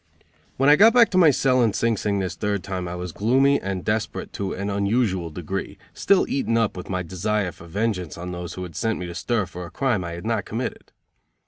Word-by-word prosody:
When 135 - +3
I 150 +1 +7
got 225 +3 +7
back 235 -2 +6
to 185 - +1
my 165 -4 +7
cell 130 -2 +3
in 115 -4 +2
Sing 115 +2 +1
Sing 100 0 -1
this 95 -3 -2
third 100 +1 -2
time 95 -2 -4
I 85 - -5
was 90 -1 -5
gloomy 135 - +3
and 95 -2 -4
desperate 105 0 -2
to 100 -1 -3
an 100 +1 -4
unusual 100 -3 0
degree, 90 +5 -5 0.2
still 200 - +3
eaten 115 -4 0
up 115 -2 +1
with 90 - -8
my 95 -1 -1
desire 95 +2 -1
for 85 - -14
vengeance 95 -2 -2
on 90 +1 -6
those 90 -2 -6
who 90 - -5
had 85 -4 -9
sent 110 +5 -1
me 90 - -5
to 85 - -6
stir 105 +4 -1
for 90 0 -8
a 85 - -8
crime 120 -7 0
I 85 -1 -5
had 85 +3 -8
not 110 -3 0
committed. 120 +4 -5
100 Hz, 235 wpm, -23 LUFS, 90-115 Hz, 0.2 s, I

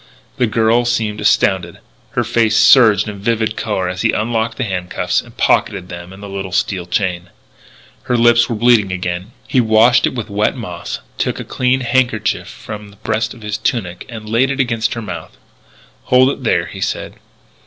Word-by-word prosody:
The 125 - +2
girl 115 +2 +2
seemed 110 -3 -1
astounded; - - +2 0.4
her 120 - +3
face 115 -1 +2
surged 110 -6 +6
in 105 -1 -6
vivid 110 0 0
colour 100 -5 -2
as 90 +1 -4
he 115 - +2
unlocked 115 +1 -1
the - - -1
handcuffs 90 -4 -1
and - - -17
pocketed 90 - +1
them 85 +1 -8
and 95 +2 -12
the - - -6
little 95 -1 -5
steel 90 -1 -1
chain. 90 -1 -2 0.8
Her 125 - +1
lip 120 0 +5
was 120 - +4
bleeding 115 -4 +4
again. 90 +2 -4 0.2
He 130 - +3
washed 110 +2 +4
it - - -4
with 115 -4 -4
wet 105 +3 0
moss, 90 -8 -6 0.2
took - - -1
a - - -4
clean 130 +1 0
handkerchief 115 -7 0
from 105 +3 -9
the 100 - -17
breast 110 +3 -2
of 115 - -14
his 105 0 -3
tunic 95 -6 -2
and 110 -3 -8
laid 115 +5 +2
it 140 0 -3
against 115 -3 0
her 115 - -5
mouth. 85 -6 -8 0.7
"Hold 130 +1 +4
it 135 - -7
there," 115 - +1
he - - -9
said. - - -3
110 Hz, 185 wpm, -17 LUFS, 100-120 Hz, 0.8 s, surged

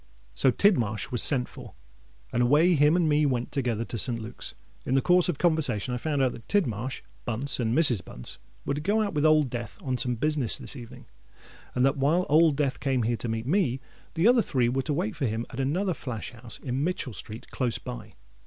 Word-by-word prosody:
_'—So 135 - +3
Tidmarsh 120 - +1
was 120 - +3
sent 130 -4 +3
for; - - -12 0.6
and 120 - +1
away 150 +9 +4
him 150 +1 +4
and 175 -2 +2
me 150 0 +3
went 125 -4 -1
together 120 -5 -1
to 115 - -4
St. 115 +2 +1
Luke's. 115 +2 -8 0.3
In 130 - -1
the - - +5
course 180 0 +4
of 165 - -1
conversation 140 - +1
I - - -1
found 145 -1 0
out 130 - +2
that 115 - -12
Tidmarsh, 130 - -1 0.2
Bunce, 125 +5 0
and 115 0 0
Mrs. 130 - +4
Bunce - - -7 0.3
were - - 0
to 145 - -3
go 210 +6 +1
out 205 - -3
with 150 0 +2
Old 155 -4 +3
Death 120 -3 -6
on 130 -2 -2
some 125 -1 0
business 145 -1 0
this - - -6
evening; 120 -4 -11 0.7
and 125 +1 +3
that 135 +2 +1
while 155 +7 +2
Old 155 0 +5
Death 140 -2 -1
came 130 -3 0
here 115 +1 0
to 120 - -3
meet 115 0 -3
me, 140 -5 +1 0.4
the 170 +6 +3
other 245 -1 +5
three 125 - 0
were 135 +2 0
to 135 - -4
wait 110 -6 -2
for 135 - -1
him 110 +2 -3
at 125 - -7
another 175 +8 0
flash 125 -9 -6
house 115 -1 -7
in 130 +1 -3
Mitchell 155 -7 -2
Street 110 +4 -7
close 125 -3 -1
by." - - -9
135 Hz, 220 wpm, -27 LUFS, 120-155 Hz, 0.7 s, the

